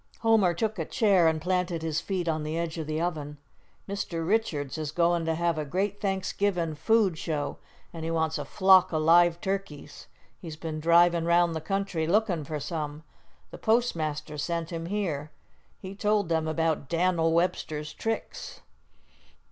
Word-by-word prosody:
Homer 220 -6 +3
took 215 +2 -2
a 160 - -1
chair 195 -5 +3
and 160 -1 +1
planted 180 -1 -1
his 160 -1 -1
feet 185 -3 -3
on 155 -1 0
the 155 +2 -3
edge 170 0 -3
of 155 - -4
the 155 0 -2
oven. 155 -4 -3 0.5
"Mr. 175 -5 -3
Richards 170 -10 0
is 150 -2 -3
goin' 170 0 +1
to 165 0 0
have 170 -1 0
a - - -1
great 190 +7 -2
Thanksgivin' 190 -3 -1
food 195 0 +2
show, 150 -3 -3 0.3
an' 165 - -7
he 160 - -3
wants 160 -1 0
a - - -4
flock 190 -2 +5
o' 160 - 0
live 170 +2 +5
turkeys. 190 -7 -5 0.3
He's 165 -4 -8
been 155 0 -5
drivin' 170 +1 +4
round 170 0 +3
the 160 - -3
country 190 -2 -2
lookin' 180 -5 +1
for 150 +1 -4
some. 150 -1 -5 0.5
The - - -9
postmaster 155 -10 0
sent 170 +2 -2
him 165 -1 -4
here. 170 -7 -2 0.5
He 190 0 -8
told 205 -3 0
him 160 -1 +1
about 160 -3 -1
Dan'l 170 -1 +2
Webster's 160 -3 -1
tricks." 225 0 -5
170 Hz, 165 wpm, -27 LUFS, 155-190 Hz, 0.5 s, flock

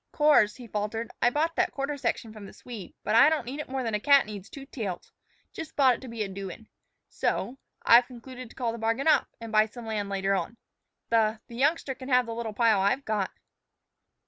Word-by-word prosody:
"Course," 295 -9 +4
he 250 - -11
faltered, 220 +1 -3
"I 240 - +5
bought 315 +5 0
that 370 0 +3
quarter 275 +1 -3
section 230 -5 -3
from 210 -2 -10
the - - -13
Swede. 230 -7 -10
But - - -1
I 230 +6 +7
don't 310 -6 -1
need 265 +5 -6
it 300 - -6
more 260 -1 -2
'n 225 - -2
a 210 - +1
cat 280 +4 +5
needs 205 -1 -9
two 275 -1 -9
tails. 205 -10 -6 0.4
Jus' 320 -1 -7
bought 265 -3 +5
it - - -7
to 260 - -9
be 230 -2 -3
a - - -4
doin'. 195 +2 -8 0.4
So 265 +3 -2 0.3
I've 240 +1 +7
concluded 255 0 -10
to - - -17
call 240 -3 -1
the 230 - -7
bargain 225 +6 0
off, 315 - +4
and 230 -1 -8
buy 215 0 +4
some 235 +1 -10
land 210 -2 -3
later 195 0 0
on. 230 +4 -2 0.5
The 220 -1 +2
the 235 - -12
youngster 280 +2 +1
can 260 +1 -10
have 250 -1 +4
the 230 - -5
little 230 -1 -4
pile 220 -2 +3
I've 200 +8 +1
got." 210 -3 -1
230 Hz, 225 wpm, -27 LUFS, 215-265 Hz, 0.5 s, I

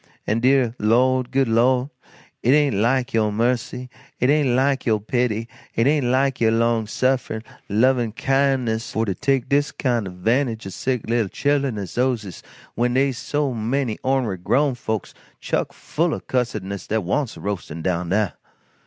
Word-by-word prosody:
An' 110 +2 +1
deah 130 -1 +3
Lord, 125 +4 +2
good 135 0 +1
Lord, 125 +4 +2 0.5
it 125 - +4
ain't 145 -2 +3
like 120 +5 +1
yo' 110 -2 +2
mercy, 125 +3 -1 0.3
it 125 +3 +3
ain't 150 -3 +3
like 135 0 +1
yo' 110 -2 +3
pity, 115 +1 -1 0.3
it 115 - +2
ain't 145 -2 +2
like 130 +1 +1
yo' 115 - +4
long 115 -1 +1
sufferin' 130 -2 -1 0.3
lovin' 120 +2 +2
kindness 130 -2 0
for 110 - 0
to 100 - -1
take 135 +4 0
dis 145 +1 +1
kind 120 -6 -1
o' - - -6
'vantage 115 +5 0
o' 95 - -6
sick 125 +5 -2
little 115 -3 +1
chil'en 140 -3 0
as 100 -4 -5
dose 125 -3 +1
is 95 -3 -9 0.3
when 120 +1 0
dey's 135 -1 +1
so 145 0 -1
many 120 +1 -1
ornery 130 -7 0
grown 140 +10 +1
folks 110 -4 -4 0.3
chuck - - -1
full 165 +1 -1
o' - - -6
cussedness 105 -6 -3
dat 110 -1 0
wants 125 +8 -1
roastin' 85 -5 -5
down 90 -1 -1
dah. 105 +1 +2
120 Hz, 170 wpm, -22 LUFS, 110-135 Hz, 0.5 s, it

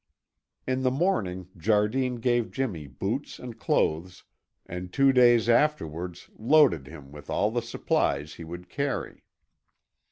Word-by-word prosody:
In 130 0 -1
the 130 - +2
morning 110 - -1
Jardine 110 +7 +1
gave 120 -1 0
Jimmy 100 - -3
boots 65 - -4
and - - -9
clothes, 85 +4 0 0.4
and 90 0 -7
two 135 +6 +4
days 120 -3 +5
afterwards 90 - 0
loaded 135 - +4
him 70 -3 -12
with 75 0 -12
all 105 - +1
the 120 +1 -1
supplies 75 -10 -1
he 85 - -10
would 85 +2 -8
carry. 140 +8 -3
105 Hz, 130 wpm, -27 LUFS, 85-130 Hz, 0.4 s, days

